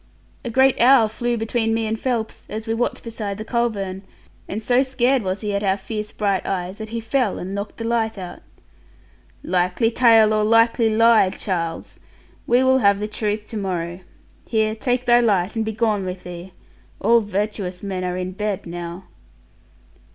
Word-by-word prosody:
'A 240 - -4
great 265 +3 +3
owl 245 -2 +6
flew 240 +2 -2
between 225 0 0
me 225 0 -1
and 220 0 -2
Phelps, 235 -4 -3
as 215 +1 -5
we 225 - -1
watched 240 +2 -2
beside 215 -4 -5
the 215 - -6
culvern, 205 -6 -2 0.5
and 215 +3 -5
so 245 +3 +3
scared 260 -1 +1
was 190 -1 -3
he 210 -2 -2
at 200 - -1
our 195 -1 +2
fierce 210 +1 -5
bright 200 -3 0
eyes 185 +2 -3
that 220 0 -6
he 230 +1 -3
fell 230 -1 0
and 190 +2 -5
knocked 200 +1 -5
the 230 - -5
light 225 -2 0
out.' 180 -2 -8 1.0
'Likely 180 +6 +1
tale, 225 -3 +5
or 215 0 +2
likely 230 +1 +4
lie, 225 -2 +5
Charles! 170 -4 -4 0.5
We 245 +2 +4
will 260 0 +4
have 200 -3 +4
the 210 +1 -3
truth 210 0 -3
to 225 - -4
morrow. 175 -3 -3 0.5
Here 220 -1 +1
take 245 +3 -1
thy 240 -1 +5
light, 200 -5 +1
and 225 - 0
be 220 - -2
gone 215 -2 0
with 185 0 -5
thee. 175 +1 -9 0.5
All 235 0 +4
virtuous 205 -3 -3
men 190 -2 -3
are 180 0 -2
in 185 0 -3
bed 205 0 -3
now.' 175 +1 -6
215 Hz, 180 wpm, -21 LUFS, 190-230 Hz, 1.0 s, owl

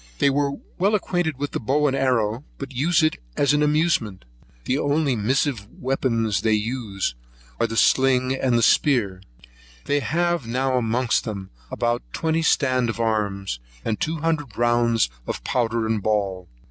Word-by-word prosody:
They - - +3
are 140 0 +1 0.3
well 200 +4 +3
acquainted 175 -7 -1
with 145 +1 -3
the - - -2
bow 145 +6 +1
and 135 -2 +2
arrow, 125 -3 +1
but 140 -1 -7
use 155 +6 +2
it 155 - +2 0.2
as 145 0 +3
an 145 - +2
amusement. 150 - +1 0.4
The 130 +3 0
only 145 -2 +1
missive 120 0 0
weapons 115 -6 -1
they 110 0 +2
use 105 - -2 0.5
are 115 - +2
the 115 0 -5
sling 130 0 +3
and 125 -3 +1
spear. 105 -12 +2 0.6
They 145 - +1
have 170 -2 0
now 130 +2 0
amongst 120 -1 +1
them 100 -4 -6 0.2
about 120 0 -1
twenty 160 0 0
stand 130 -6 +2
of 115 - -4
arms, 100 - -1 0.3
and 110 - -1
two 160 +1 -1
hundred 150 -7 -2
rounds 120 - +2 0.2
of - - -4
powder 115 -2 0
and 110 -1 0
ball. 100 -4 -1
125 Hz, 160 wpm, -23 LUFS, 110-145 Hz, 0.6 s, They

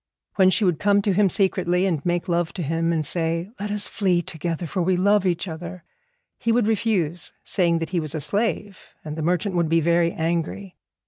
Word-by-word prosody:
When 190 -1 +6
she 205 +3 +2
would 175 -4 +1
come 205 0 +3
to 200 - +2
him 200 +1 +3
secretly 185 -2 +1
and 165 -7 -1
make 175 -1 -1
love 170 -1 0
to 180 - -4
him, 165 +3 0
and 160 -2 0
say, 165 +4 -1
'Let 205 +1 -3
us 205 0 -2
flee 180 -4 +1
together, 165 +1 -4
for 185 +3 -2
we 180 +1 +2
love 200 +1 +3
each 180 +2 -1
other,' 170 +2 -7 0.6
he 230 - 0
would 235 -1 +3
refuse, 195 -7 0
saying 170 -3 +2
that 165 +1 -4
he 180 - +1
was 155 -1 -4
a - - -1
slave, 205 - -2 0.2
and 150 -1 -5
the 160 - -4
merchant 180 +4 0
would 170 -3 +1
be 165 +1 +3
very 170 +1 +2
angry. 170 +4 -3
175 Hz, 210 wpm, -23 LUFS, 165-195 Hz, 0.6 s, When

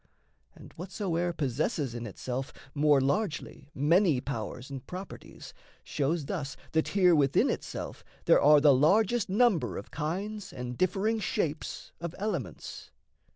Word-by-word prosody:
And - - -14
whatsoe'er 175 -1 -2
possesses 145 - -1
in 120 -1 -5
itself 130 +6 -4 0.2
More 145 -1 +4
largely 145 -1 -2
many 160 +1 +3
powers 125 0 -5
and 135 -2 -6
properties 185 +2 -9 0.3
Shows 150 +2 -1
thus 140 -5 -4
that 160 0 +1
here 180 -3 +6
within 140 -4 +3
itself - - -5 0.2
there - - +5
are 150 +1 +7
The 145 -1 +6
largest 200 - +3
number 190 - +2
of 100 - -8
kinds 190 +7 -4
and 125 -1 -6
differing 195 - +1
shapes 160 -5 -3
Of 170 0 -5
elements. 210 +2 -4
155 Hz, 130 wpm, -29 LUFS, 135-190 Hz, 0.3 s, are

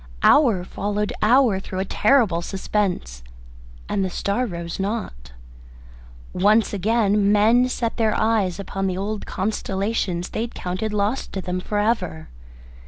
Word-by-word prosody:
Hour 230 -12 +5
followed 205 +3 -3
hour 235 -3 +4
through 190 -1 -7
a 190 - -1
terrible 210 -5 +2
suspense, 185 - -2 0.7
and 195 - 0
the 190 - -1
star 200 +7 -1
rose 170 -3 -6
not. 190 - -4 1.0
Once 210 +4 +3
again 205 0 +2
men 225 +4 +4
set 230 -2 -2
their 220 -2 +1
eyes 210 -5 +1
upon 195 0 -3
the 185 -1 -2
old 205 +2 -4
constellations 195 -2 -2
they - - -3
had 235 +1 -5
counted 185 +4 -3
lost 210 +5 -1
to 190 - -3
them 180 0 -3
for 205 +3 -3
ever. 205 - -1
205 Hz, 140 wpm, -22 LUFS, 185-220 Hz, 1.0 s, Hour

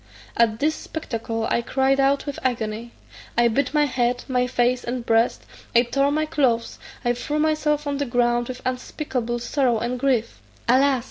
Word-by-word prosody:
At 225 -2 +3
this 300 +4 +1
spectacle 230 -8 -4
I - - +2
cried 265 +2 +1
out 275 +1 +2
with 285 -2 -5
agony. 235 -2 -2 0.5
I 240 0 +5
beat 255 +4 0
my 300 -1 +3
head, 245 -2 0
my 250 -2 +1
face, 245 0 +1
and 240 0 -4
breast; 230 +1 +2 0.3
I 235 - +7
tore 275 +3 +1
my 310 +1 +1
clothes; 260 -7 0 0.3
I 240 - +3
threw 295 +5 -3
myself 305 -1 +1
on 285 -1 -1
the 285 - -1
ground 240 0 +1
with 255 -1 -7
unspeakable 250 -1 -3
sorrow 245 0 +1
and 240 +3 -2
grief! 250 -4 0 0.3
"Alas!" 265 +2 +4
250 Hz, 175 wpm, -23 LUFS, 235-280 Hz, 0.5 s, I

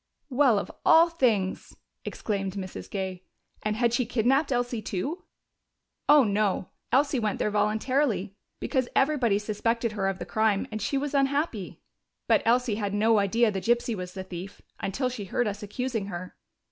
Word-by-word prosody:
"Well, 255 -4 +4
of - - -3
all 330 +1 +6
things!" 225 - 0 0.3
exclaimed 195 -3 -3
Mrs. 190 -2 -7
Gay. 190 -2 -4 0.4
"And 215 0 -1
had 235 +1 +1
she 240 -1 +1
kidnaped 260 +5 +2
Elsie 245 -2 -1
too?" 280 - -4 0.8
"Oh 295 -1 +8
no, 205 -3 0 0.2
Elsie 275 +1 +3
went 215 -3 -1
there 210 - 0
voluntarily, 215 -1 0 0.2
because 260 -4 -1
everybody 270 -7 +3
suspected 230 +2 -1
her 200 -2 -1
of 195 -1 -1
the - - -6
crime, 215 -2 +1
and 215 0 -4
she 275 - 0
was 290 +1 -2
unhappy. 275 - 0 0.5
But - - +4
Elsie 235 -2 +2
had 200 0 -1
no 220 +1 +4
idea 220 +3 +2
the 190 -2 -3
gypsy 235 +3 +1
was 180 -1 -7
the 190 - -4
thief, 185 +1 -8 0.2
until 255 +7 -1
she 245 -5 -5
heard 235 +5 0
us 205 0 -4
accusing 225 0 -3
her." 180 -1 -7
220 Hz, 165 wpm, -27 LUFS, 200-255 Hz, 0.8 s, Oh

